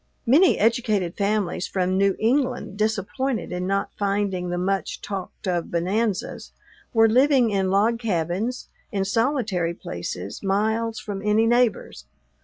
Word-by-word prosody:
Many 315 +10 +5
educated 215 -6 +1
families 200 -3 -1
from 185 -1 0
New 195 0 +2
England, 250 -3 0
disappointed 220 +4 -1
in 180 0 -3
not 195 +1 -1
finding 195 -3 -1
the 175 - -2
much 195 +2 -1
talked 195 0 -6
of 175 -2 -1
bonanzas, 190 +4 -2 0.4
were 225 -1 +5
living 255 0 +4
in 195 -2 +1
log 215 +4 +2
cabins, 205 +3 -2 0.2
in 195 -3 -1
solitary 210 - 0
places, 90 - -6
miles 220 +3 0
from 205 -2 -5
any 210 +2 +2
neighbors. 235 - +1
205 Hz, 130 wpm, -24 LUFS, 185-230 Hz, 0.4 s, Many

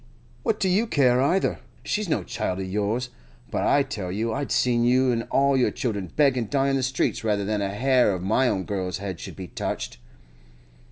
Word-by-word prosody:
What 225 -2 0
do 190 - +1
you 200 +6 +2
care 130 - +3
either? 175 +8 +1 0.2
She's 210 -3 -2
no - - 0
child 95 -5 -3
of 95 - -3
yours. 105 +6 -1 0.4
But - - -1
I 140 - +4
tell 105 -10 -5
you 110 +4 -1
I'd 140 -1 -3
see 125 -1 +2
you 125 +2 +3
an' 115 -1 -2
all 140 0 +3
your 130 - +3
children 100 -8 -3
beg 140 -3 +4
an' 115 - -2
die 140 -1 +1
in - - +1
the 135 - +1
streets 130 -2 -1
rather 105 -2 0
than 105 0 -1
a 100 - -1
hair 125 +2 +3
of 90 -2 -3
my 110 +7 +2
own 95 -5 0
girl's 95 -1 -3
head 95 -3 -5
should - - -8
be 95 -3 -8
touched! - - -4
120 Hz, 215 wpm, -25 LUFS, 100-135 Hz, 0.4 s, I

